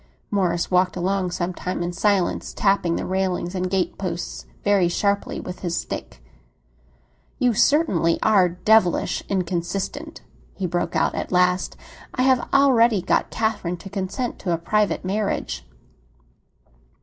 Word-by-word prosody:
Morris 180 Hz, -4 st, 0 dB
walked 180 Hz, 0 st, +3 dB
along 185 Hz, +1 st, 0 dB
some 175 Hz, +1 st, -2 dB
time 180 Hz, 0 st, -3 dB
in 175 Hz, 0 st, -3 dB
silence, 195 Hz, 0 st, 0 dB
tapping 195 Hz, -4 st, +2 dB
the -, -, -3 dB
railings 185 Hz, -1 st, -1 dB
and 185 Hz, -1 st, -2 dB
gateposts 180 Hz, -2 st, -3 dB, 0.2 s
very 200 Hz, -3 st, +3 dB
sharply 200 Hz, +3 st, 0 dB
with 180 Hz, -, -7 dB
his 170 Hz, -2 st, -2 dB
stick. -, -, -6 dB, 1.1 s
"You 250 Hz, -2 st, +2 dB
certainly 205 Hz, -, +3 dB
are 195 Hz, -5 st, +4 dB
devilish 180 Hz, +1 st, +2 dB
inconsistent!" 190 Hz, -, -3 dB, 0.3 s
he 190 Hz, -, -3 dB
broke 175 Hz, 0 st, -2 dB
out -, -, +2 dB
at -, -, -4 dB
last. 180 Hz, 0 st, +2 dB, 0.4 s
"I 255 Hz, -, +1 dB
have 260 Hz, -2 st, +2 dB
already 235 Hz, -7 st, +4 dB
got -, -, +1 dB
Catherine 210 Hz, -6 st, -1 dB
to 195 Hz, +2 st, -11 dB
consent 200 Hz, +5 st, -3 dB
to 180 Hz, -, -2 dB
a -, -, +1 dB
private 210 Hz, +4 st, 0 dB
marriage." 195 Hz, -, -2 dB
185 Hz, 135 wpm, -23 LUFS, 175-210 Hz, 1.1 s, are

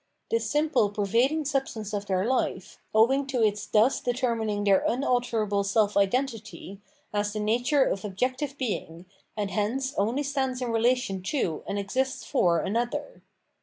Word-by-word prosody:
This 230 Hz, -1 st, 0 dB
simple 295 Hz, -6 st, +2 dB
pervading 235 Hz, +10 st, +1 dB
sub 275 Hz, -1 st, 0 dB
stance 215 Hz, -2 st, -7 dB
of 205 Hz, 0 st, -3 dB
their 190 Hz, 0 st, +1 dB
life, 255 Hz, +2 st, -1 dB
owing 265 Hz, +6 st, +3 dB
to 255 Hz, -4 st, 0 dB
its 210 Hz, -1 st, 0 dB
thus 220 Hz, +5 st, +3 dB
determining 230 Hz, -5 st, -1 dB
their 195 Hz, -2 st, +5 dB
unalterable 235 Hz, -5 st, 0 dB
self 205 Hz, +1 st, +1 dB
identity, 210 Hz, -2 st, -1 dB, 0.3 s
has 205 Hz, 0 st, -1 dB
the 215 Hz, -, -3 dB
nature 245 Hz, +6 st, +2 dB
of 195 Hz, -6 st, -1 dB
objective 255 Hz, +8 st, -2 dB
being, 185 Hz, -9 st, -4 dB, 0.3 s
and 205 Hz, -2 st, -2 dB
hence 260 Hz, +6 st, -1 dB
only 235 Hz, +8 st, +1 dB
stands 265 Hz, -2 st, -1 dB
in 250 Hz, -2 st, -2 dB
relation 230 Hz, -4 st, +1 dB
to 185 Hz, -, -1 dB
and 200 Hz, -, -2 dB
exists 255 Hz, +7 st, -1 dB
for 170 Hz, -2 st, +2 dB
''another.' 240 Hz, -, -2 dB
225 Hz, 150 wpm, -27 LUFS, 205-260 Hz, 0.3 s, their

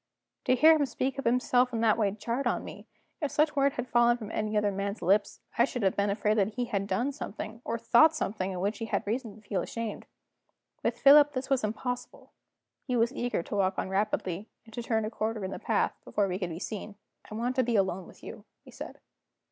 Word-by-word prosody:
To 255 Hz, -, +4 dB
hear 315 Hz, +5 st, +7 dB
him 290 Hz, -3 st, +1 dB
speak 265 Hz, +1 st, -2 dB
of -, -, -5 dB
himself 250 Hz, +1 st, +3 dB
in 225 Hz, -2 st, -2 dB
that 220 Hz, -2 st, +4 dB
way 215 Hz, -3 st, +2 dB
jarred 230 Hz, +6 st, -2 dB
on -, -, 0 dB
me. -, -, -10 dB, 0.3 s
If 295 Hz, -, 0 dB
such 300 Hz, +1 st, +1 dB
words 280 Hz, 0 st, +2 dB
had 245 Hz, 0 st, -3 dB
fallen 240 Hz, 0 st, +4 dB
from 220 Hz, -2 st, -8 dB
any 215 Hz, 0 st, -1 dB
other 210 Hz, -1 st, +2 dB
man's 200 Hz, +2 st, -4 dB
lips, 200 Hz, +4 st, +2 dB, 0.2 s
I 235 Hz, -, +7 dB
should 250 Hz, -4 st, -4 dB
have 190 Hz, -, +2 dB
been 200 Hz, 0 st, +1 dB
afraid 210 Hz, +1 st, +1 dB
that 205 Hz, +2 st, 0 dB
he 245 Hz, -, -1 dB
had 200 Hz, -4 st, -2 dB
done 255 Hz, +6 st, 0 dB
something, 225 Hz, -4 st, -7 dB
or 230 Hz, -, -2 dB
thought 310 Hz, +8 st, +5 dB
something, 195 Hz, -9 st, -2 dB
of 180 Hz, -, -4 dB
which 205 Hz, +2 st, -1 dB
he 225 Hz, -, -3 dB
had -, -, -2 dB
reason 225 Hz, 0 st, -3 dB
to 215 Hz, -1 st, -19 dB
feel 190 Hz, -3 st, 0 dB
ashamed. 230 Hz, +1 st, -5 dB, 0.7 s
With 235 Hz, +1 st, -1 dB
Philip 290 Hz, +3 st, +7 dB
this 265 Hz, 0 st, -4 dB
was 265 Hz, -4 st, +2 dB
impossible. 245 Hz, +4 st, -4 dB, 0.5 s
He 255 Hz, -, -3 dB
was 235 Hz, +2 st, +2 dB
eager 245 Hz, -10 st, -2 dB
to -, -, -5 dB
walk 190 Hz, -1 st, +1 dB
on -, -, -2 dB
rapidly, 195 Hz, -1 st, -1 dB, 0.2 s
and 225 Hz, -, -16 dB
to 240 Hz, -, -4 dB
turn 225 Hz, -2 st, 0 dB
a 215 Hz, -, -4 dB
corner 220 Hz, -2 st, -2 dB
in 190 Hz, -, -4 dB
the -, -, -5 dB
path, -, -, +1 dB
before 205 Hz, -1 st, 0 dB
we 185 Hz, 0 st, -3 dB
could 180 Hz, -3 st, -2 dB
be 165 Hz, -, -6 dB
seen. 210 Hz, +2 st, -6 dB, 0.3 s
"I 215 Hz, -, -7 dB
want 245 Hz, +3 st, -1 dB
to 260 Hz, -, +4 dB
be 235 Hz, -1 st, 0 dB
alone 190 Hz, -3 st, 0 dB
with -, -, -17 dB
you," -, -, -9 dB, 0.2 s
he -, -, -13 dB
said. -, -, -8 dB
225 Hz, 235 wpm, -29 LUFS, 200-250 Hz, 0.7 s, hear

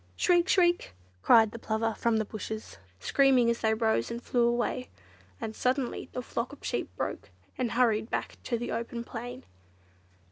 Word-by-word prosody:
"Shriek! 350 Hz, 0 st, +3 dB
Shriek!" 350 Hz, -, +3 dB, 0.3 s
cried 220 Hz, -, +6 dB
the 230 Hz, -, -8 dB
Plover 225 Hz, 0 st, -1 dB
from 230 Hz, 0 st, +1 dB
the 220 Hz, -, 0 dB
bushes, 215 Hz, +1 st, -6 dB, 0.2 s
screaming 260 Hz, -, +4 dB
as 235 Hz, -, -3 dB
they 220 Hz, -1 st, +2 dB
rose 220 Hz, -, +1 dB
and 235 Hz, -, -4 dB
flew 240 Hz, -1 st, +1 dB
away; 240 Hz, +1 st, -1 dB, 0.5 s
and 220 Hz, -, -5 dB
suddenly 255 Hz, 0 st, -1 dB
the 250 Hz, -, -4 dB
flock 235 Hz, +2 st, -3 dB
of 290 Hz, -, -12 dB
sheep -, -, -2 dB
broke -, -, -4 dB, 0.3 s
and 245 Hz, -3 st, -1 dB
hurried 225 Hz, -2 st, +2 dB
back -, -, -3 dB
to 235 Hz, -, 0 dB
the 240 Hz, -, -4 dB
open 235 Hz, +1 st, -3 dB
plain. 240 Hz, +1 st, -7 dB
235 Hz, 170 wpm, -29 LUFS, 220-250 Hz, 0.5 s, cried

